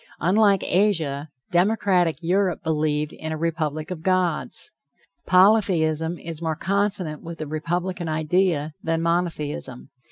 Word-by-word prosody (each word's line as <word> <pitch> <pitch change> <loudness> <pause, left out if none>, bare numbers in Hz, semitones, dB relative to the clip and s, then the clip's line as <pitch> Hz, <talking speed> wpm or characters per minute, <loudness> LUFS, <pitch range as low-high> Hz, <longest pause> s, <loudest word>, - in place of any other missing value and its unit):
Unlike 200 +1 +3
Asia, 160 -7 0 0.2
democratic 180 -3 +2
Europe 185 +1 +1
believed 150 -1 0
in 160 - -6
a 160 - -3
republic 155 -1 -2
of 170 -3 -5
gods. 180 -2 0 0.6
Polytheism 175 -5 +3
is 165 -1 -7
more 160 -1 -1
consonant 195 -3 0
with 170 0 -8
the 155 - -5
republican 170 +3 -3
idea, 155 -1 0
than 165 0 -1
monotheism. 160 -7 -2
165 Hz, 120 wpm, -23 LUFS, 155-185 Hz, 0.6 s, Unlike